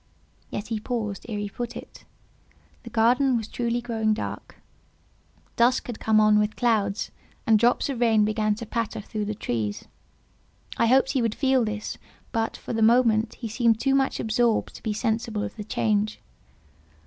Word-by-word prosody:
Yet 205 - -5
he 225 -2 -1
paused 215 -3 -4
ere 215 - -3
he 205 0 -3
put 240 +3 -5
it. - - -12 0.8
The 235 - -10
garden 245 +3 +3
was 220 -2 -4
truly 235 +1 -2
growing 220 -2 0
dark; - - -6 1.0
dusk 240 +2 +3
had 240 -3 -6
come 220 -1 +3
on 215 0 +5
with 210 0 0
clouds, 215 -4 0 0.3
and 220 -1 +5
drops 240 +2 +3
of 270 -4 -3
rain 220 -3 +4
began 215 0 +1
to 230 +2 -7
patter 230 0 -3
through 210 0 -4
the 215 +1 -3
trees. 110 - -3 0.9
I 230 - +2
hoped 265 +2 +4
he 265 - +1
would 230 -2 0
feel 265 -3 +2
this, 210 -1 -4 0.3
but, 225 -2 -1
for - - -6
the 225 - -1
moment, 225 -1 +4
he 235 - -6
seemed 225 0 +2
too 270 +2 +1
much 270 -1 +1
absorbed 225 +1 +1
to - - -11
be 220 - -2
sensible 220 0 -1
of - - -5
the 215 - -6
change. 215 0 0
225 Hz, 175 wpm, -25 LUFS, 215-240 Hz, 1.0 s, on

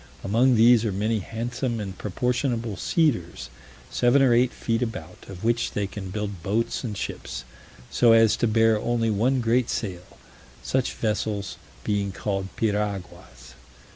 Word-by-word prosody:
Among 120 +6 +3
these 115 0 +6
are 110 - 0
many 105 +3 0
handsome 115 +3 -3
and 95 -3 -5
proportionable 120 - -1
cedars, 85 - 0 0.4
seven 125 +3 +4
or 125 -3 +5
eight 125 +1 +3
feet 115 -1 -2
about, 95 -10 -5
of 95 0 -9
which 115 +1 0
they 105 - -1
can 100 -1 -7
build 100 -2 -4
boats 105 +9 -1
and 105 -5 -4
ships, - - -5 0.5
so 120 -2 +5
as 115 -1 +6
to 120 - +1
bear 110 0 +3
only 115 0 0
one 125 +5 +1
great 120 +1 +2
sail; 90 -5 -5 0.5
such 130 -1 0
vessels 105 -2 -2 0.3
being 100 -1 -1
called 95 0 -3
piraguas. 100 - -3
110 Hz, 145 wpm, -25 LUFS, 100-120 Hz, 0.5 s, these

